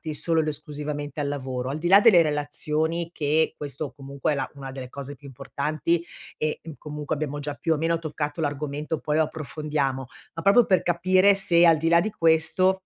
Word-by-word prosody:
solo 165 +2 +1
ed 155 - -3
esclusivamente 150 -1 -5
al 145 - -1
lavoro. 130 -3 -4
Al 140 - -3
di 170 +2 -2
là 195 +2 +8
delle 205 -5 +7
relazioni, 155 +2 -1
che 155 +1 +1
questo 145 0 -5
comunque 140 0 -3
è - - 0
la 140 - -3
una 135 -1 -8
delle 130 -1 -8
cose 140 +2 -7
più 140 +1 -14
importanti 150 +5 -2 0.3
e, 155 0 -2
mhmm, 160 - -8
comunque 150 0 -5
abbiamo 145 -1 -4
già 145 0 -3
più 160 +3 0
o - - -1
meno 165 +2 0
toccato 150 -1 -4
l'argomento, 150 +1 -3
poi 150 0 -1
lo 160 - +4
approfondiamo. 150 -4 -3 0.3
Ma 165 - -6
proprio 200 +6 +5
per 185 -3 +3
capire 185 +3 +3
se 175 -3 +4
al 165 -1 +5
di 165 +2 0
là 170 0 +6
di 215 - -1
questo 170 +2 +2
150 Hz, 200 wpm, -25 LUFS, 145-165 Hz, 0.3 s, là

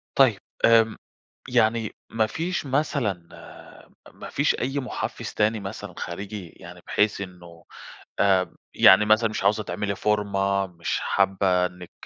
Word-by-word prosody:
طيب، 125 -7 +4 0.3
امم، 115 -1 +4 0.5
يعني 110 0 +1
ما 110 -1 +1
فيش 165 +7 -3
مثلًا 130 - -1 0.8
ما - - -10
فيش - - +1
أي 135 +3 -1
محفز 130 - -5
تاني 110 +1 +1
مثلًا 100 -1 -7
خارجي؟ 95 +1 -6
يعني 90 +1 -12
بحيث 105 -1 +1
إنه 90 -3 -10 0.6
آآ، 95 -2 +2 0.2
يعني 100 +3 +7
مثلًا 110 +1 +4
مش 110 - -4
عاوزة 105 +2 +2
تعملي 100 0 -3
فورمة 100 -1 0
مش 85 -2 -3
حابة 95 -2 +2
إنِك 90 -1 -8
100 Hz, 130 wpm, -24 LUFS, 95-110 Hz, 0.8 s, يعني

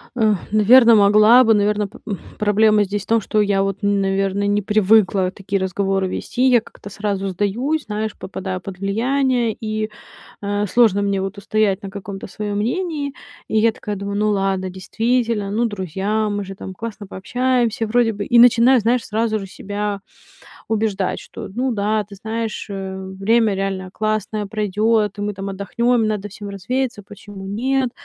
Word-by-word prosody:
Э, 220 -3 +3 0.2
наверное, 230 +3 +7
могла 215 +4 +6
бы. 225 - +4
Наверное, 210 0 +1
п - - -14 0.4
проблема 210 0 +3
здесь 205 +1 -3
в - - -19
том, 230 0 +3
что 215 +2 +1
я 200 -1 +2
вот, 195 0 -2
наверное, 195 0 0
не 205 0 +1
привыкла 200 -2 +3
такие 195 0 -3
разговоры 195 0 0
вести. 255 +7 0
Я 240 -3 +5
как-то 205 - -13
сразу 200 -1 -2
сдаюсь, 235 - -1
знаешь, 215 0 -3
попадаю 185 -1 -5
под 190 -1 -8
влияние, 240 +3 +1
и, 215 0 -3 0.5
э, 205 0 -1
сложно 215 -2 +3
мне 200 -1 0
вот 195 +1 -4
устоять 205 0 0
на 195 - -6
каком-то 195 0 -7
своем 205 +1 -4
мнении. 290 - -2 0.3
И 220 - 0
я 225 +1 +4
такая 210 -1 -6
думаю: 200 +1 -4
"Ну 210 0 +1
ладно, 195 -2 0
действительно, 225 +2 -1
ну, 225 +4 0
друзья, 205 +1 -2
мы 205 0 -2
же 195 - -7
там 190 -1 -8
классно 220 -1 -7
пообщаемся 240 +2 0
вроде 230 0 +2
бы". 205 0 -4
И 240 - +3
начинаю, 245 +1 +6
знаешь, 235 +2 +1
сразу 220 0 -1
же 195 - -7
себя 205 +1 -4 0.7
убеждать, 210 -4 -1
что - - -9
ну 250 +3 -1
да, 210 0 0
ты 200 - -12
знаешь, 220 +2 -4
э, 190 -1 -5 0.2
время 220 0 +3
реально 190 -1 -3
классное 215 0 -2
пройдет, 210 0 0
и - - -5
мы 205 0 -2
там 195 0 -5
отдохнем, 235 +5 0
и - - 0
надо 210 -1 -3
всем 205 +1 -9
развеяться. 235 +4 -3
Почему 205 -1 -11
нет? 255 +6 0
210 Hz, 170 wpm, -20 LUFS, 195-225 Hz, 0.7 s, наверное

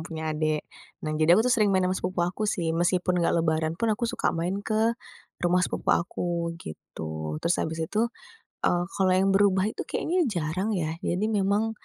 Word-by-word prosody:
punya 160 -1 -3
adik. 155 0 0 0.4
Nah, 155 - -1
jadi 170 +3 +6
aku 220 - +3
sering 215 -5 +3
main 190 -1 +3
sama 185 - +1
sepupu 180 -1 -1
aku 205 +4 -2
sih 165 -5 0
meskipun 175 +1 +1
gak 170 - +2
Lebaran 160 0 +1
pun 225 +1 +1
aku 230 +3 -1
suka - - 0
main 175 +4 -1
ke, 225 +2 +1 0.5
rumah 180 +1 +3
sepupu 180 - 0
aku 170 -1 -1
gitu, 80 - -6
terus 170 - +3
habis 160 0 -2
itu, 220 +7 0 0.6
eee, 175 0 +2
kalau 190 -1 +2
yang 195 +1 +3
berubah 195 -1 +4
itu - - -6
kayaknya 345 -1 0
jarang 180 0 -1
ya 160 -4 -1
jadi 180 +4 -1
memang, 205 +3 +1
180 Hz, 180 wpm, -27 LUFS, 165-200 Hz, 0.6 s, jadi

